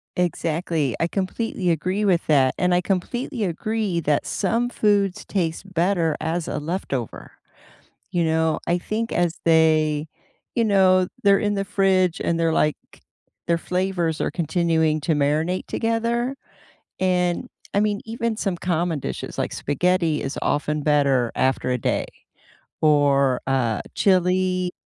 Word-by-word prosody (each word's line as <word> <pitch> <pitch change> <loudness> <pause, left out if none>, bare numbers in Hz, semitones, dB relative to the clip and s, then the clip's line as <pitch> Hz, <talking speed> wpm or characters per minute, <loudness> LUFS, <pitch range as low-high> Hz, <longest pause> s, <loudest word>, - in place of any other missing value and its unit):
Exactly, 165 -5 -1
I 165 - +1
completely 190 +1 -2
agree 185 +6 0
with 185 -4 +2
that, 135 -4 +3
and 180 0 +2
I 175 - +3
completely 225 +7 -2
agree 200 +1 -1
that 150 -2 +1
some 230 +5 0
foods 205 -5 +1
taste 180 0 -3
better 170 -2 +1
as 165 +1 -2
a - - -3
leftover, 150 - -4 0.8
you 175 -1 +1
know? 160 0 +1
I 175 - +1
think 225 +5 -3
as 175 -1 0
they 155 -2 +3 0.5
you 230 - +2
know, 185 -3 +4 0.2
they're 200 -1 +5
in 205 -1 0
the 195 -1 -1
fridge 190 -2 +1
and 170 0 -1
they're, 165 -1 +2
like 150 -1 +2 0.7
their 170 - +2
flavors 180 -2 -1
are - - -1
continuing 160 -2 +1
to 160 - +1
marinate 155 +5 0
together, 235 +3 -1 0.6
and, 180 -2 +1 0.3
I 200 - +3
mean, 210 -1 0
even 230 0 -2
some 195 -4 -1
common 170 -2 -1
dishes, - - -6
like - - -1
spaghetti 165 +2 0
is 135 - -4
often 150 0 -1
better 140 -5 +2
after 130 -1 +1
a 125 - +1
day, 115 - -1 0.8
or, 140 -3 +3
uh, 125 -5 0
chili 185 -1 +2
175 Hz, 140 wpm, -23 LUFS, 155-195 Hz, 0.8 s, they're